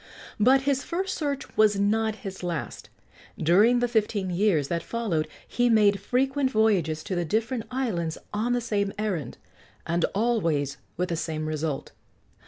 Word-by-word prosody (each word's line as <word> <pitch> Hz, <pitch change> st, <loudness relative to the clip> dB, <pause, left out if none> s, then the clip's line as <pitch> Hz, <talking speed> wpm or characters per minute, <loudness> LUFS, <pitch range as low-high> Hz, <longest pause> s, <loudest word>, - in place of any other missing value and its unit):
But 260 Hz, +5 st, +5 dB
his 275 Hz, 0 st, 0 dB
first 375 Hz, +3 st, -2 dB
search 285 Hz, -3 st, -3 dB
was 210 Hz, -2 st, +4 dB
not 220 Hz, +2 st, +1 dB
his 190 Hz, -1 st, -6 dB
last. 175 Hz, -4 st, -4 dB, 0.5 s
During 210 Hz, +10 st, +4 dB
the 245 Hz, -, +2 dB
fifteen 210 Hz, -5 st, 0 dB
years 175 Hz, -6 st, +2 dB
that 170 Hz, +3 st, -1 dB
followed 200 Hz, -10 st, -2 dB, 0.2 s
he 245 Hz, 0 st, +1 dB
made 205 Hz, -3 st, +4 dB
frequent 265 Hz, +6 st, +1 dB
voyages 190 Hz, -, +1 dB
to -, -, -4 dB
the 175 Hz, -, 0 dB
different 225 Hz, +6 st, -1 dB
islands 215 Hz, -11 st, -2 dB, 0.2 s
on 225 Hz, +4 st, 0 dB
the 245 Hz, -, +1 dB
same 205 Hz, -4 st, -1 dB
errand, 185 Hz, -, -3 dB, 0.5 s
and 170 Hz, +1 st, 0 dB
always 170 Hz, -, +1 dB, 0.2 s
with 180 Hz, 0 st, -1 dB
the 170 Hz, -, 0 dB
same 155 Hz, -1 st, -3 dB
result. 155 Hz, -2 st, -3 dB
210 Hz, 155 wpm, -26 LUFS, 170-240 Hz, 0.5 s, But